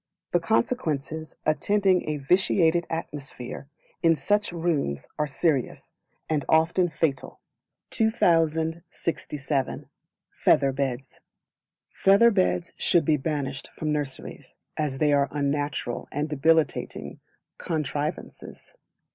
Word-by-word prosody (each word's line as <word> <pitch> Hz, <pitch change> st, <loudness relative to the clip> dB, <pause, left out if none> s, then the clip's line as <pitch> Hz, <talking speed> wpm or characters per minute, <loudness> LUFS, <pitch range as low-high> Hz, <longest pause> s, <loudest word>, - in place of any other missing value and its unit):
The 175 Hz, -, +3 dB
Consequences 160 Hz, -, -1 dB
attending 190 Hz, +2 st, +2 dB
a 150 Hz, -, -1 dB
vitiated 170 Hz, +2 st, +2 dB
atmosphere 145 Hz, -5 st, -6 dB, 0.3 s
in 165 Hz, -1 st, +4 dB
such 205 Hz, +9 st, 0 dB
rooms 160 Hz, -, -1 dB
are 150 Hz, -, +1 dB
serious, 145 Hz, -2 st, -1 dB, 0.4 s
and 150 Hz, -3 st, 0 dB
often 165 Hz, +3 st, +3 dB
fatal. 155 Hz, -3 st, -2 dB, 0.5 s
2067. 160 Hz, -, 0 dB, 0.5 s
Feather 135 Hz, -, +3 dB
Beds. 135 Hz, -1 st, -3 dB, 0.7 s
Feather 200 Hz, +5 st, +5 dB
Beds 185 Hz, -3 st, 0 dB
should 170 Hz, -3 st, +3 dB
be 155 Hz, 0 st, +3 dB
banished 140 Hz, -1 st, -3 dB
from 155 Hz, -1 st, -1 dB
nurseries, 145 Hz, -3 st, -5 dB, 0.2 s
as 150 Hz, -3 st, -2 dB
they 150 Hz, 0 st, +3 dB
are 140 Hz, -1 st, +3 dB
unnatural 145 Hz, -3 st, -2 dB
and 145 Hz, +2 st, -1 dB
debilitating 160 Hz, +2 st, 0 dB, 0.4 s
contrivances. 155 Hz, -, -4 dB
155 Hz, 95 wpm, -26 LUFS, 140-170 Hz, 0.7 s, Feather